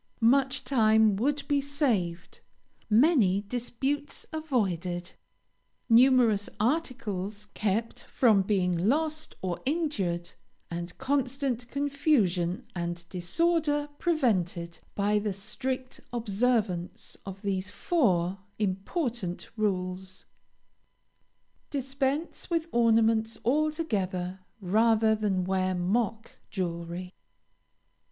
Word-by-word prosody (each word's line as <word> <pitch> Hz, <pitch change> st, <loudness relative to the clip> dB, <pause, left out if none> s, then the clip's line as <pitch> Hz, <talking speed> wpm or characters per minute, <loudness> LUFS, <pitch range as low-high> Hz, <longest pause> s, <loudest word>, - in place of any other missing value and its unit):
Much 270 Hz, -1 st, +1 dB
time 220 Hz, -5 st, +4 dB
would 280 Hz, +7 st, 0 dB
be 285 Hz, -1 st, +2 dB
saved; 230 Hz, -, -1 dB, 0.5 s
many 220 Hz, -, +4 dB
disputes 250 Hz, +6 st, -3 dB
avoided; 190 Hz, -, -1 dB, 0.8 s
numerous 235 Hz, -4 st, +5 dB
articles 215 Hz, -, -1 dB
kept 215 Hz, +2 st, -1 dB
from 220 Hz, -6 st, +4 dB
being 190 Hz, -2 st, +1 dB
lost 310 Hz, -, 0 dB
or 180 Hz, -2 st, -2 dB
injured, 210 Hz, -, -1 dB, 0.4 s
and 170 Hz, +1 st, -5 dB
constant 265 Hz, -2 st, -1 dB
confusion 265 Hz, -, +1 dB
and 170 Hz, 0 st, -4 dB
disorder 295 Hz, -, +1 dB
prevented, 185 Hz, -, 0 dB, 0.2 s
by 210 Hz, +1 st, +2 dB
the 205 Hz, -1 st, -2 dB
strict 255 Hz, +6 st, -4 dB
observance 220 Hz, -5 st, -1 dB
of 195 Hz, +1 st, -8 dB
these 190 Hz, -2 st, -1 dB
four 195 Hz, -, +1 dB, 0.2 s
important 205 Hz, -, -2 dB
rules. 185 Hz, -3 st, -2 dB, 1.4 s
Dispense 275 Hz, +3 st, -2 dB
with 335 Hz, -1 st, 0 dB
ornaments 225 Hz, -1 st, +3 dB
altogether 220 Hz, -, 0 dB, 0.2 s
rather 220 Hz, +3 st, +3 dB
than 205 Hz, -4 st, 0 dB
wear 185 Hz, 0 st, 0 dB
mock 215 Hz, +5 st, -1 dB, 0.2 s
jewelry. 175 Hz, 0 st, -4 dB
220 Hz, 85 wpm, -28 LUFS, 185-270 Hz, 1.4 s, numerous